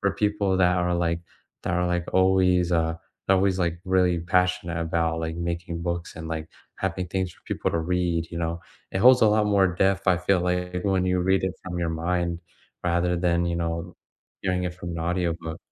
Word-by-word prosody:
for 100 - +2
people 105 -2 +1
that 90 0 +4
are, 90 0 +1
like, 85 -1 0 0.4
that - - -2
are, 90 0 +1
like, 90 -1 0
always, 95 -1 +3
uh, 80 -1 +2 0.4
always, 95 0 +3
like, 85 -2 0
really 90 -2 +2
passionate 90 -1 +1
about, 80 0 0
like, 80 0 -3
making 85 0 -3
books 85 -1 -3
and, 80 -1 -6
like, 80 -1 -4 0.3
having 95 -1 -2
things 95 +1 -1
for - - -24
people - - -2
to 85 - 0
read, 85 -1 0
you - - -4
know? 85 0 -2 0.3
It - - 0
holds 125 +5 +7
a 110 - +7
lot 105 0 +3
more 100 -2 +4
depth, 95 +2 +1
I 90 - +5
feel 90 +1 +2
like, 90 0 -1
when 95 -2 +1
you 90 0 +1
read 95 +1 +2
it 95 -1 -2
from 90 -1 -4
your 85 - 0
mind 85 +1 -1 0.4
rather 90 0 +1
than, 85 0 +1
you 85 - -1
know, 85 +1 -3 0.5
hearing 90 -1 0
it 90 -1 -3
from 85 -1 -7
an 85 - -5
audiobook. 85 -1 -2
90 Hz, 200 wpm, -25 LUFS, 85-95 Hz, 0.5 s, holds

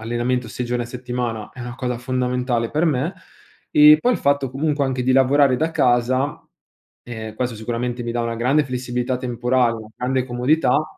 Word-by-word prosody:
allenamento 120 +2 -2
6 125 - -4
giorni 120 0 -2
a - - -8
settimana 120 -3 -4
è 130 - -11
una 120 0 -6
cosa 125 -2 -3
fondamentale 125 -1 -1
per 155 +3 +1
me 150 +3 0 0.6
e 150 0 +8
poi 250 - +2
il - - -1
fatto 140 -2 +1
comunque 145 +2 -1
anche 130 -1 -1
di 130 +1 +2
lavorare 135 0 +4
da 160 +5 0
casa, 130 0 +1 0.6
ehm, 110 -2 -7
questo 125 +1 -2
sicuramente 120 +2 -3
mi 120 0 -3
dà 120 - -1
una 115 0 -3
grande 135 +6 +2
flessibilità 125 -1 -2
temporale, 125 -1 +1
una 110 -1 -10
grande 130 +1 -1
comodità 130 +3 +2
125 Hz, 180 wpm, -21 LUFS, 120-135 Hz, 0.6 s, e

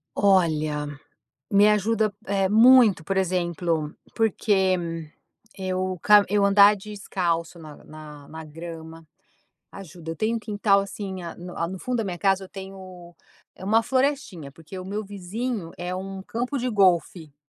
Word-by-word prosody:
Olha, 155 -6 +2 0.6
me 205 +1 +6
ajuda, 215 0 +1
eh, 195 -1 0
muito, 225 -4 +6
por 195 +4 -2
exemplo, 170 -4 -1 0.2
porque 185 -7 0 0.5
eu 185 -1 -2
ca 210 -1 +6
eu 205 0 +2
andar 200 +1 +6
descalço 185 -5 -3
na 155 -2 -12
na 150 -2 -12
na 160 0 -9
grama, 165 0 -10 0.6
ajuda 175 -4 -9
eu - - -6
tenho 220 +7 0
um - - -6
quintal, 205 -2 +2
assim, 195 -1 -5
a 170 - -7
no 180 0 -9
no 185 +1 -7
fundo 250 +4 -2
da 225 - -1
minha 185 -4 -4
casa 195 +1 +1
eu - - -17
tenho, 185 -3 -11 0.4
uma 215 +4 +2
florestinha, 255 - -1
porque 165 +5 -11
o 185 - -8
meu 205 +3 -4
vizinho 200 0 -5
é 180 +1 -4
um 190 +1 -6
campo 245 +7 -3
de 250 0 -2
golfe, 180 - +1
190 Hz, 150 wpm, -24 LUFS, 170-205 Hz, 0.6 s, me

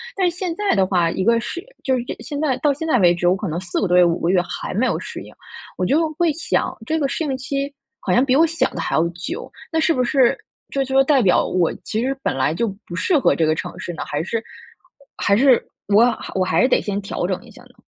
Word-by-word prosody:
但 375 -2 +2
是 - - -7
现 360 -2 -3
在 415 +2 +1
的 190 -2 +3
话， 175 -3 +2
一 190 - -2
个 230 +1 +4
是 340 +9 -5 0.2
就 265 - +1
是 - - -2 0.2
现 290 - -5
在 290 -4 +1
到 295 -2 +3
现 320 +4 -5
在 310 - +3
为 175 -3 +5
止， 175 0 -1
我 180 - +4
可 195 -1 -4
能 160 +2 -2
4 180 -1 -3
个 200 - +1
多 180 0 +3
月、 180 - +7
5 170 0 +1
个 170 - +1
月 180 -1 +4
还 175 - -5
没 220 +7 +1
有 - - 0
适 - - -7
应。 - - -14 0.4
我 185 - 0
就 315 - +2
会 345 -2 +3
想， 325 - -1
这 315 +7 0
个 300 - 0
适 320 - -2
应 270 -3 -2
期 275 +2 -3 0.3
好 185 - -1
像 245 - +4
比 255 - +2
我 320 +5 +5
想 330 +1 -1
的 - - -5
还 - - -1
要 160 - +3
久， 175 +1 -6 0.2
那 - - +1
是 330 - +3
不 255 - 0
是 260 -2 +3 0.3
这 275 -1 -1
就 265 +1 +3
代 270 -1 +3
表 190 -5 +3
我 180 -3 +1
其 220 - -2
实 265 +3 -1
本 - - 0
来 135 +3 +1
就 225 +7 -1 0.2
不 175 - -7
适 300 - +2
合 - - +3
这 165 - +2
个 155 - +2
城 155 - -6
市 - - -5
呢？ 160 - -5
还 150 +2 -2
是 225 +5 -2 0.8
还 200 - +2
是 255 +2 +5 0.3
我 210 +3 +6 0.3
我 185 -1 +1
还 185 - +2
是 255 - +5
得 - - +4
先 205 -1 -3
调 195 - -3
整 - - -3
一 - - -15
下 - - -15
呢？ - - -22
235 Hz, 285 characters per minute, -21 LUFS, 180-285 Hz, 0.8 s, 月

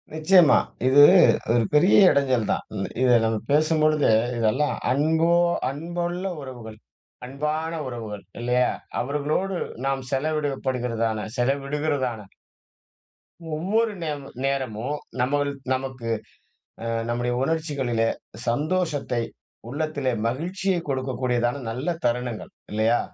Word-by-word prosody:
நிச்சயமா. 160 0 +6 0.3
இது 135 +2 +7 0.5
ஒரு 120 -1 +3
பெரிய 155 +6 +5 0.2
இடைஞ்சல் 130 -5 +2
தான். - - -1
இ - - -3 0.3
இதை 125 -1 +5
நம்ம 110 0 +1
பேசும்பொழுது, 155 0 +3 0.3
இதெல்லாம் 120 +6 +1 0.2
அன்போ, 160 +5 +2 0.4
அன்புள்ள 175 +5 -4 0.2
உறவுகள். 120 -5 -9 0.5
அன்பான 150 +5 -3
உறவுகள். 110 -4 -6 0.2
இல்லையா? 125 +1 +2 0.3
அவர்களோடு 150 +8 -1 0.3
நாம் 135 -1 0
செலவிடப்படுகிறதான, 130 -6 -1
செலவிடுகிறதான 135 -3 -1 1.3
ஒவ்வொரு 215 +8 +1
நேமு 145 -3 -4 0.2
நேரமும், 135 -1 -2 0.2
நம்மள் 145 +3 +1 0.2
நமக்கு 130 -3 -4 0.7
அ - - -5 0.2
நம்முடைய 120 +1 -1
உணர்ச்சிகளிலே 135 -7 0 0.4
சந்தோஷத்தை, 145 -1 0 0.5
உள்ளத்திலே 145 -1 -2 0.2
மகிழ்ச்சியை 180 +8 -1
கொடுக்கக்கூடியதான 130 -1 -1
நல்ல 125 +7 -4 0.2
தருணங்கள், 120 -1 -2 0.2
இல்லையா? 110 +3 +2
135 Hz, 95 wpm, -24 LUFS, 120-155 Hz, 1.3 s, இது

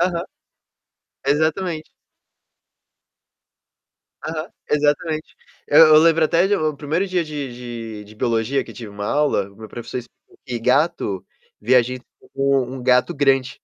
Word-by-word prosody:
Aham, 175 -1 0 1.0
exatamente. 155 +3 0 2.4
Aham, 155 +1 -4 0.2
exatamente. 155 +2 0 0.3
Eu 155 +2 +8
eu - - +9
lembro 165 0 +4
até 170 +3 +3
de 205 - +2
o 155 -4 -1
1° 160 +7 -1
dia 180 -2 0
de 145 -4 -5 0.5
de - - -13
de 105 - -15
biologia 115 +4 0
que - - -12
eu - - -12
tive 115 -3 -8
uma 100 0 -7
aula, 145 -9 +1
meu 110 +1 -11
professor 120 +3 -6
explicou 120 - -15
que 120 -2 -3
gato, 125 - +1 0.4
vê 120 +5 +2
a 125 - +7
gente 125 +2 -6 0.3
como 135 -1 +2
um 130 - -6
gato 125 +7 +3
grande. 135 -3 +1
145 Hz, 145 wpm, -21 LUFS, 125-160 Hz, 2.4 s, eu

